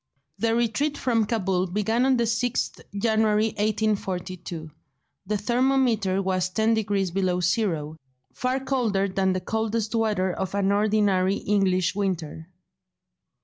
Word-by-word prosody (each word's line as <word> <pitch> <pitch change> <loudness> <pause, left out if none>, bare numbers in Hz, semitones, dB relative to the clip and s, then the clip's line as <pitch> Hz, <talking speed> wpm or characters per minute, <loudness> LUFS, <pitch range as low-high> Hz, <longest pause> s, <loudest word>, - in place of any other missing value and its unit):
The 230 0 +1
retreat 240 +6 0
from 230 -4 +1
Cabul 190 -5 0
began 220 +7 +1
on 265 -1 +3
the 235 - +2
6th 235 +2 -1 0.2
January 220 0 +2
1842; 190 -6 -2 0.6
the 210 +1 0
thermometer 235 -4 +1
was 185 -1 0
ten 220 +4 +1
degrees 200 -4 0
below 185 -1 0
zero—far 160 - -2
colder 230 -8 0
than 190 0 0
the 185 - -2
coldest 220 +2 -2
weather 210 -5 +1
of 190 +2 -4
an 200 -1 +1
ordinary 200 -2 +2
English 190 -4 +1
winter. 175 -5 -3
205 Hz, 120 wpm, -25 LUFS, 185-225 Hz, 0.6 s, on